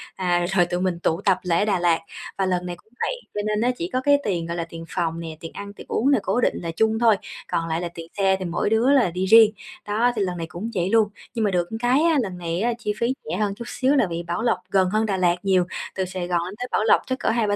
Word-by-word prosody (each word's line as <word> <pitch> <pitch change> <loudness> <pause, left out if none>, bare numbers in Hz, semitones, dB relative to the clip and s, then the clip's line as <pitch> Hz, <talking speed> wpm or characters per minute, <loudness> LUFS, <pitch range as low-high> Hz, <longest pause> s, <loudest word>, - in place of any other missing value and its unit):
à, 175 -2 +1
rồi 190 -2 +3
tụi 175 +1 -2
mình 185 -2 -1
tụ 170 +1 0
tập 195 -3 +3
lại 170 -2 +1
ở 210 - +2
Đà 205 -4 +1
Lạt. 175 -2 +3 0.4
Và 195 - +1
lần 180 -1 0
này 175 -1 -4
cũng 220 +6 -26
vậy, - - -1 0.2
cho 210 - -2
nên 210 0 0
á 245 +2 +3
chỉ 170 - -3
có 255 - +1
cái 285 +1 +5
tiền, 175 -5 -1
gọi 170 +1 -4
là, 170 - -1
tiền 165 0 -8
phòng 165 -2 -2
nè, 160 -2 -7
tiền 165 - -8
ăn, 200 0 -8
tiền - - -12
uống 270 +5 +2
nè, 275 - +4
cố 205 +6 0
định - - +1
là 170 -1 -3
chung 220 +6 +1
thôi, 230 -2 +5 0.3
còn 165 0 -1
lại 165 +1 -1
là 175 - -3
tiền 165 -1 -8
xe 195 -1 +3
thì 185 - -4
mỗi 175 +3 -1
đứa 225 +5 +3
là 260 -11 +4
đi 180 +2 -2
riêng, 220 +2 +7 0.4
đó, 225 +4 +2
thì 215 - -1
lần 180 -2 -1
này 165 -1 -4
cũng 175 +8 -6
vậy 180 0 0
luôn. 220 -1 +4 0.2
Nhưng 225 -3 0
mà 205 - +1
được 175 -2 0
một 225 - -4
cái 245 +4 +3
á, 330 -2 +3
lần 190 -5 -4
này 170 +2 -2 0.2
chi 210 -2 -2
phí 235 +2 +1
rẻ 165 +4 -3
hơn 205 -1 0
chút 235 - -8
xíu 265 +2 +1
là 260 -8 +3
vì 170 0 -3
Bảo 170 +1 -3
Lộc 235 0 +2
gần 190 -2 +3
hơn 215 +3 +1
Đà 200 -3 -1
Lạt 175 -2 +3
nhiều, 190 -2 +3 0.3
từ 190 - -1
Sài 185 -1 -4
Gòn 175 -1 +1
lên 185 - -6
tới 250 - -3
Bảo - - +1
Lộc 220 - +5
chắc 260 0 -2
cỡ - - 0
2-3 220 -3 +1
190 Hz, 300 wpm, -23 LUFS, 175-220 Hz, 0.4 s, riêng